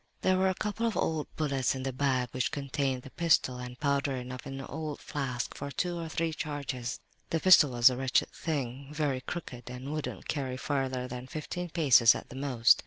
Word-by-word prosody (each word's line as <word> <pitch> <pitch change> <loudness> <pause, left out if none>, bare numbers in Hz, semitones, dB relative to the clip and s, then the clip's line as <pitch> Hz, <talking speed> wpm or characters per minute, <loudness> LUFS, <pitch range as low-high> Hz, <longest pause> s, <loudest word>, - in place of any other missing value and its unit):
"There 185 0 +3
were 190 0 +4
a 185 - 0
couple 210 +4 -1
of 225 - -1
old 155 -2 0
bullets 140 -3 +1
in 130 - -4
the 135 -1 -2
bag 130 -2 +1
which 125 -1 0
contained 135 -2 -1
the 135 - -11
pistol, 160 -7 +2
and 125 0 -7
powder 140 -1 +1
enough 125 +1 -6
in 135 0 -5
an 135 - -6
old 155 -2 -5
flask 130 -4 -3
for 140 - -5
two 175 +4 -2
or 165 -1 -4
three 165 0 -1
charges. 140 -5 -4 0.3
"The 165 - +1
pistol 170 -4 +7
was 120 0 +6
a 125 - -3
wretched 130 0 +1
thing, 135 -3 -3
very 145 -4 -1
crooked 125 -5 -6
and 125 +4 -6
wouldn't 155 -1 -4
carry 130 -4 -2
farther 130 -2 -1
than 125 0 -6
fifteen 175 +5 -4
paces 135 -8 +6
at - - -7
the - - -10
most. 130 -4 +4
135 Hz, 205 wpm, -30 LUFS, 125-155 Hz, 0.3 s, pistol